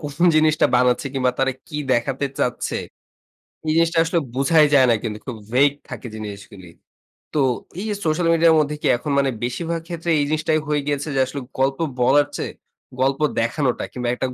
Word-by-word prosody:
কোন 145 -1 -6 0.2
জিনিসটা 155 0 +4
বানাচ্ছে 125 +2 +2
কিংবা 130 -1 +2
তারা 135 0 +2 0.2
কি 150 - -6 0.2
দেখাতে 135 +4 0
চাচ্ছে। 125 - -1 0.9
এই - - +2
জিনিসটা 165 0 +2
আসলে 170 +1 +1 0.2
বোঝাই 150 +3 +4
যায় 130 -2 +6
না 115 - +4
কিন্তু 105 -2 -3
খুব 125 -4 -6 0.2
vaid 140 +2 +4 0.2
থাকে 125 - -7
জিনিসগুলি। 100 -4 -9 0.6
তো, 150 - +1 0.4
এই 210 - -4
যে 210 - -1
সোশ্যাল 160 +2 +1
মিডিয়ার 165 -1 +5
মধ্যে 150 0 0
কি - - 0
এখন 145 +4 -4
মানে 135 -1 +2
বেশিভাগ 165 +7 -2
ক্ষেত্রে 170 -1 -5
এই - - +2
জিনিসটাই 155 0 +1
হয়ে 150 -1 +1
গিয়েছে 145 +1 -1
যে, 135 - +1
আসলে 135 +2 -6 0.2
গল্প 135 +2 +1 0.2
বলার 140 +4 +4
চেয়ে, - - -4 0.5
গল্প 135 +2 +1 0.2
দেখানোটা 125 +3 0
কিংবা 125 -1 -4
একটা 130 - -2
140 Hz, 180 wpm, -21 LUFS, 125-155 Hz, 0.9 s, যায়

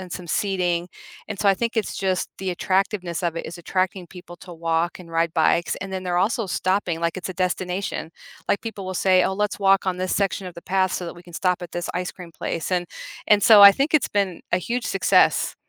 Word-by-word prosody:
and 185 -1 -9
some 180 - -6
seating. 180 -1 -1 0.4
And 210 - -5
so 205 - +2
I 195 - +5
think 230 +3 -3
it's 220 - -1
just 190 -2 -1
the 190 -1 -3
attractiveness 185 -1 -1
of 170 -1 -1
it - - -4
is 170 - -7
attracting 185 +1 -2
people 175 -1 -12
to 180 - -11
walk 165 +1 -1
and 180 -2 -12
ride 165 0 0
bikes. 170 +1 +2
And 190 0 -7
then 185 -1 -3
they're 180 -1 -1
also 220 +5 +1
stopping 185 -2 -1
like 170 +1 -1
it's 185 - -5
a - - -4
destination. 180 -1 -2 0.4
Like - - +1
people 220 -4 -6
will 185 0 -5
say, 185 0 +4
"Oh - - 0
let's 210 +1 -2
walk 195 0 +3
on 185 - 0
this 185 0 -2
section 195 -1 -1
of 175 - -12
the 170 - -10
path 190 0 +1
so 180 - -3
that 170 - -7
we 175 - -14
can 175 -1 -15
stop 180 0 0
at 175 - -7
this 175 0 -4
ice 180 0 -2
cream 175 -2 -12
place." 165 +3 -3
And 180 -1 +1 0.4
and 210 -1 +6
so 215 -3 +9
I 200 - +12
think 275 +9 -1
it's 300 - +3
been 195 -4 -1
a 175 - +2
huge 235 +6 -3
success. 195 -1 +3
185 Hz, 240 wpm, -23 LUFS, 175-195 Hz, 0.4 s, I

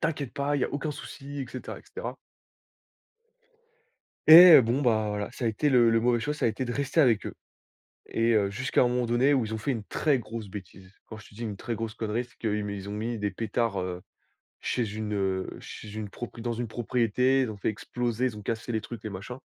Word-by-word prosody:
t'inquiète 150 -5 -2
pas, 145 +1 0
il - - -1
y - - +2
a - - -3
aucun 145 +2 -2
souci» 140 -1 -8
et 130 - -4
cetera, 130 - -7
et - - -17
cetera. - - -6 2.1
Et 170 +2 +11
heu, 130 - +9
bon, 120 +5 0
bah, 110 -5 +2
voilà, 105 0 -3
ça 125 - -5
a 115 - +3
été 130 +7 0
le 120 -4 +5
le 115 - +3
mauvais 120 0 +2
choix, 150 +6 -2
ça 150 - -1
a - - +4
été 110 +4 -2
de 120 - -3
rester 140 +4 -2
avec 120 -8 +3
eux. - - -6 0.8
Et 115 +1 +1
heu, 100 -3 +3
jusqu'à 130 +8 0
un 125 - +5
moment 125 0 0
donné 125 +5 +3
où 120 -4 +1
ils 110 - -5
ont 110 - -3
fait 125 - -3
une 115 -4 -3
très 145 +6 +1
grosse 115 -2 -7
bêtise. 95 -1 -10
Quand 110 - -9
je 110 - -13
te 100 - -18
dis 120 - -6
une 105 -3 -4
très 115 +3 -4
grosse 110 0 -4
connerie, 115 +2 -2
c'est 125 - -25
qu'ils 105 -2 -1
mis 100 - -4
ils 100 0 -7
ont 105 - -4
mis 115 +2 -3
des 105 0 0
pétards, 110 0 -1
heu, 90 0 -4 0.6
chez 110 -4 -2
une, 105 -1 -3
heu, 95 -2 -1
chez 105 -1 -9
une 110 -2 -5
prop 120 +2 -8
dans 120 +1 -2
une 120 +1 -3
propriété, 125 +3 +1
ils 120 -4 -1
ont 105 - -9
fait 100 - -1
exploser, 120 +3 -2
ils 110 -4 -2
ont - - -8
cassé 115 +3 -3
les 110 -1 -1
trucs, 120 - -8
les 110 - -5
machins. 100 +7 -7
115 Hz, 250 wpm, -27 LUFS, 105-125 Hz, 2.1 s, Et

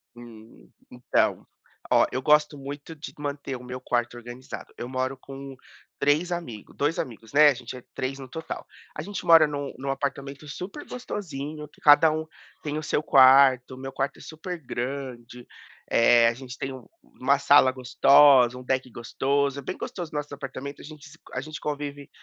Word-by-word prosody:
Hum, 110 - -14 0.2
então, 125 0 0 0.5
ó, - - +6
eu 130 - -2
gosto 150 +1 +3
muito 145 +3 -8
de 150 - -9
manter 140 -2 -4
o 125 - -13
meu 125 +1 -7
quarto 120 0 -1
organizado. 120 +2 -9
Eu 120 - -5
moro 130 +1 -2
com 135 0 -10 0.4
3 150 +5 +2
amigos, 140 -12 -6
2 150 +3 0
amigos, 115 -1 -6
né, 150 +1 +8
a 145 - +3
gente 130 - -8
é 125 - -12
3 135 +1 -3
no 130 -2 -10
total. 160 +2 -6 0.3
A 155 - -4
gente 200 +1 -6
mora 165 -2 +8
num 145 -1 -5
num 135 +2 -5
apartamento 140 +1 -4
super 185 - -7
gostosinho, 155 - -6
que - - -25
cada 150 +2 +7
um 155 +1 -3 0.4
tem 150 0 -3
o 155 - -4
seu 150 - -1
quarto, 130 -2 +6
meu 135 +1 -7
quarto 135 +1 -3
é - - -14
super 170 +3 -7
grande, 125 -2 -6 0.4
eh, 115 0 +5
a 115 - +2
gente 130 +1 -10
tem 135 0 -4
um 130 - -11 0.2
uma 140 +2 0
sala 140 -1 +5
gostosa, 130 0 +5
um 125 - -9
deck 130 0 -1
gostoso. 140 +4 -1
É - - -6
bem 185 - -5
gostoso 175 -4 -6
nosso 150 -1 -4
apartamento, 140 0 -7
a - - -11
gente 150 -1 -12
se 155 - -16
co - - -19
a 125 - -2
gente 155 +2 -8
convive 145 -1 -5
140 Hz, 185 wpm, -26 LUFS, 130-150 Hz, 0.5 s, né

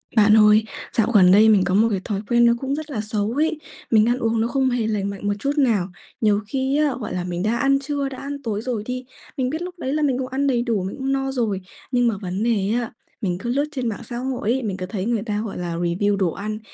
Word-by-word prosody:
Bạn 215 0 +6
ơi, 210 0 +6 0.3
dạo 230 +1 +2
gần 185 -4 +7
đây 215 +3 +7
mình 200 -3 +5
có 185 - -1
một 220 +3 +5
cái 195 - 0
thói 205 -2 -2
quen 240 -1 +5
nó 235 - +5
cũng 270 +1 -1
rất 310 0 -6
là 220 -6 -2
xấu 215 0 -2
ấy, 310 +4 0 0.3
mình 215 -1 +5
ăn 245 - +2
uống 225 -2 +1
nó 230 - +1
không 265 +1 +1
hề 240 -3 0
lành 205 -2 -1
mạnh 200 0 -5
một 205 - +2
chút 275 +6 0
nào. 225 -10 +2 0.3
Nhiều 210 -2 +3
khi 265 +4 0
á, 300 -2 +2
gọi 220 - -5
là, 180 - -2
mình 175 0 -3
đã 220 +3 +1
ăn 275 +2 +3
trưa, 280 0 -2
đã 265 - -8
ăn 280 0 -6
tối 215 -3 -2
rồi 235 -3 -3
đi, 255 +1 -4 0.3
mình 255 -2 0
biết 315 +5 -3
lúc 360 0 -6
đấy 265 -3 -2
là 305 - 0
mình 270 -4 +2
cũng 260 -1 -3
ăn 270 +2 -1
đầy 245 -3 +2
đủ, 230 -6 -1
mình 190 - -4
cũng 270 0 -2
no 270 0 0
rồi. 220 -7 -1 0.3
Nhưng 245 -1 +3
mà 225 - +1
vấn 185 +2 -3
đề 215 -4 +1
á, 240 -1 -1 0.3
mình 180 -4 -1
cứ 235 +6 -5
lướt 280 +4 +1
trên 255 -5 -3
mạng 210 - -5
xã 240 - -4
hội 250 -3 -2
ấy, 260 +1 0
mình 200 -4 -3
cứ 185 - -4
thấy 190 0 -4
người 230 -2 0
ta, 210 -2 -2
gọi 205 - -6
là, 175 -1 -3
review 175 +4 0
đồ 185 -4 +1
ăn, 215 +4 -5
230 Hz, 285 wpm, -22 LUFS, 205-265 Hz, 0.3 s, gần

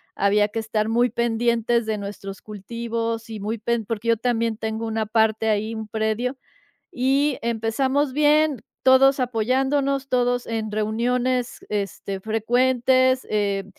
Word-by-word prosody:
había 205 +1 +3
que 225 - -3
estar 220 0 -1
muy 240 +2 +3
pendientes 235 0 +1
de 215 -1 -1
nuestros 200 -1 -7
cultivos 230 +2 -4
y 215 - -6
muy 215 +3 -3
pen 235 0 -1
porque 230 +1 -3
yo 230 - +4
también 230 -2 0
tengo 220 0 -3
una 220 0 -1
parte 220 0 +2
ahí, 215 +2 0
un 220 -1 -6
predio, 220 +5 -1 0.6
y 270 +2 +1
empezamos 255 +5 0
bien, 300 -3 +3 0.2
todos 265 +1 +5
apoyándonos, 265 +4 0
todos 245 -1 +1
en 220 -2 -3
reuniones, 240 +4 -1
este, 195 -1 -3
frecuentes, 255 +4 +2
eh, 200 -2 0
230 Hz, 135 wpm, -23 LUFS, 220-255 Hz, 0.6 s, todos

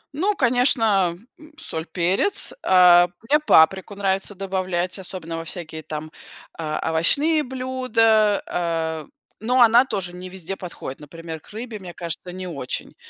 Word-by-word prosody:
Ну, 395 +7 0
конечно, 225 - +2 0.2
м, 310 0 -16
соль, 160 - -5
перец. 190 - +2
А, 175 -1 +6 0.2
мне 300 +4 +4
паприку 190 - +3
нравится 195 0 -1
добавлять, 185 -2 -2
особенно 170 -3 -6
во 165 - -5
всякие 160 -2 -6
там, 155 0 -7 0.5
а, 155 -2 -3
овощные 285 - +3
блюда, 245 -5 +1
э, 165 -2 -3 0.4
но 250 +1 +3
она 235 +1 +7
тоже 195 -8 -4
не 180 +1 -8
везде 190 0 -6
подходит, 170 -7 -8
например, 160 +1 -9
к - - -19
рыбе, 225 +1 -7
мне 180 -2 -10
кажется, 170 +1 -5
не 185 +1 -7
очень. 140 -7 -6
185 Hz, 140 wpm, -22 LUFS, 170-230 Hz, 0.5 s, она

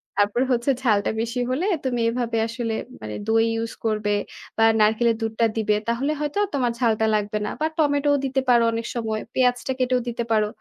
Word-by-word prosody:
তারপর 205 +4 +2
হচ্ছে 245 +2 +2
ঝালটা 210 -5 +2
বেশি 235 +2 -3
হলে 290 +9 0 0.2
তুমি 245 -2 0
এভাবে 235 -1 -2
আসলে 230 -1 -3 0.3
মানে 110 -1 -6
দই 225 0 +3
ইউজ 225 0 -3
করবে 215 -1 0 0.5
বা 225 - +4 0.2
নারকেলের 220 +2 +3
দুধটা 225 +1 0
দিবে। 215 -1 +2
তাহলে 250 +6 0
হয়তো 295 +5 -2
আর 405 - -2
তোমার 245 -3 +1
ঝালটা 220 -3 +2
লাগবে 210 0 -1
না। - - -2
বা - - +3
টমেটোও 285 -2 +2
দিতে 270 0 0
পারো 240 -1 +5
অনেক 230 0 -3
সময়। 220 -2 -2
পেঁয়াজটা 250 0 +1
কেটেও 255 0 +2
দিতে 235 0 -2
পারো। 215 -1 +3
230 Hz, 185 wpm, -23 LUFS, 220-255 Hz, 0.5 s, পারো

